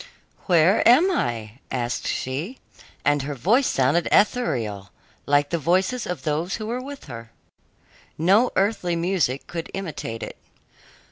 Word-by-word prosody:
"Where 175 +3 +4
am 320 +11 +6
I?" 115 - -3
asked 120 -2 -2
she, 150 - -3 0.5
and 145 0 +3
her 145 +2 -4
voice 225 - +2
sounded 140 +6 +2
ethereal, 115 - +1 0.4
like 145 0 +2
the 170 - 0
voices 185 - +1
of 180 - -4
those 160 +4 -1
who 215 - -5
were 240 +3 -3
with 280 +1 -9
her. 115 -4 -9 0.9
No 195 +10 +4
earthly 190 -3 +1
music 170 -6 0
could 165 -1 -6
imitate 155 -11 -5
it. - - -8
170 Hz, 135 wpm, -23 LUFS, 130-205 Hz, 0.9 s, am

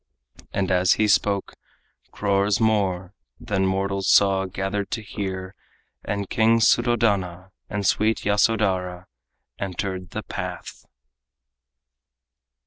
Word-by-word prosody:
And 95 -1 -1
as 90 0 +4
he 110 - +1
spoke, 100 -1 +1 0.6
crores 100 0 +1
more 100 -4 0 0.3
than 95 -2 0
mortals 95 0 -1
saw 95 -1 +4
Gathered 95 +2 -3
to 115 - -3
hear, 95 -2 -5 0.5
and 100 -1 -3
King 115 +1 +3
Suddhodana 105 -7 +1 0.2
And 100 -1 -3
sweet 110 +4 +1
Yasodhara 100 -4 +1 0.5
entered 95 -1 -4
the - - -5
path. - - -7
100 Hz, 100 wpm, -23 LUFS, 95-105 Hz, 0.6 s, as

